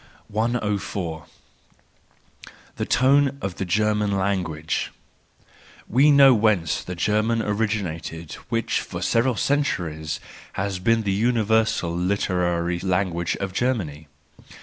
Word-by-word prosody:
104. 105 -7 -2 1.5
The - - -2
Tone 140 +2 +3
of 95 -2 -5
the 95 - -2
German 105 +1 +1
Language 90 -5 -1 1.0
.—We 135 +6 +4
know 140 -2 +8
whence 105 -8 +1
the 90 - -6
German 110 +5 +1
originated 95 -7 -3 0.2
which 115 0 0
for - - -6
several 120 +2 +2
centuries 85 - -1 0.3
has 95 -1 -2
been 115 +4 +2
the 100 - 0
universal, 110 -5 +1
literary 90 -2 0
language 90 -2 0
of 95 -1 -4
Germany. 90 - -2
100 Hz, 105 wpm, -23 LUFS, 85-115 Hz, 1.5 s, know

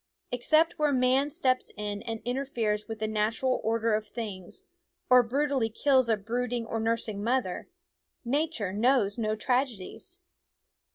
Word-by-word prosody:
Except 310 +7 +2
where 300 -1 +3
man 260 +2 +3
steps 255 -3 0
in 205 -1 -3
and 225 -1 -5
interferes 240 -5 -1
with 225 -1 -5
the 215 0 -2
natural 220 +4 0
order 225 0 +1
of 215 0 -1
things, 205 -5 -7 0.5
or 250 0 +9
brutally 265 0 0
kills 260 +1 +2
a 220 - +3
brooding 240 +3 -2
or 225 0 -3
nursing 220 -2 -1
mother, 240 - -1 0.6
Nature 275 - -1
knows 225 -1 +2
no 215 -1 0
tragedies. 255 - -2
230 Hz, 135 wpm, -28 LUFS, 215-260 Hz, 0.6 s, or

